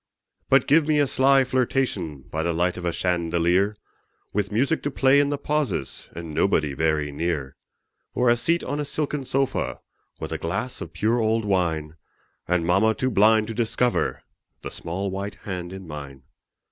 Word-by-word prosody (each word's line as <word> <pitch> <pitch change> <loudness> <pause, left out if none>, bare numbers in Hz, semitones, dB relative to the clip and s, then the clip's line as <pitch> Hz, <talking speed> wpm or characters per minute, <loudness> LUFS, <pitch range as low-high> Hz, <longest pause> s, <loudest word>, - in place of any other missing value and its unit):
But 135 0 +5
give 150 +1 +4
me 155 -1 +3
a 145 - +4
sly 135 0 +4
flirtation 125 - -1
By 80 - -1
the 85 +1 0
light 90 +2 +1
of 90 - -6
a 85 - +1
chandelier 85 +3 +1 0.6
With 100 0 -1
music 135 +9 +1
to 145 - -1
play 135 0 +4
in 145 0 +2
the 145 - -1
pauses, 145 - -2
And 85 -2 -7
nobody 75 -3 +1
very 75 0 0
near; 70 -3 -2 0.6
Or 125 - +2
a 120 - +6
seat 170 +8 +1
on 145 +3 -3
a - - 0
silken 150 -1 -2
sofa, 135 +1 -1 0.4
With - - -5
a - - -3
glass 95 +10 -3
of 85 - -7
pure 110 +7 +1
old 110 0 +1
wine, 80 -5 0 0.5
And 90 -1 +1
mamma 100 +6 +3
too 130 0 -1
blind 110 +1 +5
to - - -3
discover 120 +2 0 0.4
The - - -5
small 95 +4 -4
white 100 +2 -4
hand 90 -3 -4
in 95 0 -8
mine. 70 -3 -8
100 Hz, 175 wpm, -24 LUFS, 85-130 Hz, 0.6 s, a